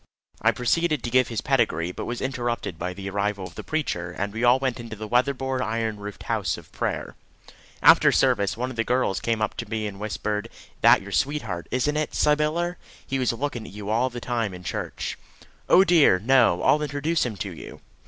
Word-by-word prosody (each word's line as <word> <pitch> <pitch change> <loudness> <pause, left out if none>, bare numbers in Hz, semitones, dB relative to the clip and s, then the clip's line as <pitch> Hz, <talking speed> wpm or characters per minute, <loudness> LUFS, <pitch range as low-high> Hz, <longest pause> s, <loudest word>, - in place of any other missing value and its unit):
I - - +4
proceeded 155 +4 +1
to 120 - -3
give 130 0 +4
his 115 -3 -3
pedigree, 110 - +1
but - - -6
was 120 0 -4
interrupted 120 -9 -3
by 90 +2 -2
the 95 +1 -7
arrival 100 -1 -1
of - - -10
the - - -8
preacher, 115 - -2
and 100 +3 -4
we 115 +2 -3
all 120 +1 +6
went 130 -2 -2
into 115 -2 -7
the 110 0 -7
weatherboard 130 +2 0
iron 110 -2 -1
roofed 105 0 -8
house - - -1
of - - -14
prayer. - - -3 0.7
After - - +7
service, 100 +2 +2
one 125 +2 -2
of 125 - -10
the 115 - +2
girls 125 -5 +1
came 115 -2 -1
up 105 - -2
to 115 - -5
me 110 -1 -2
and 100 -2 -6
whispered, 105 +1 -3 0.3
"that - - +7
is - - -12
your - - -9
sweetheart, 115 - -1
isn't 145 +4 0
it, 155 - -2
Sybyller? 155 +4 +1 0.3
He 135 0 -2
was 125 - +2
looking 120 -2 -4
at - - -12
you 105 0 -5
all 120 +4 +2
the 120 -1 -7
time 115 -5 -2
in 90 - -11
church." - - -4 0.5
"Oh 185 - +7
dear, 170 - +5
no! 115 -4 +3
I'll 150 - +4
introduce 150 +3 0
him 115 -5 -3
to 100 0 -4
you." 85 - -10
120 Hz, 210 wpm, -25 LUFS, 105-135 Hz, 0.7 s, After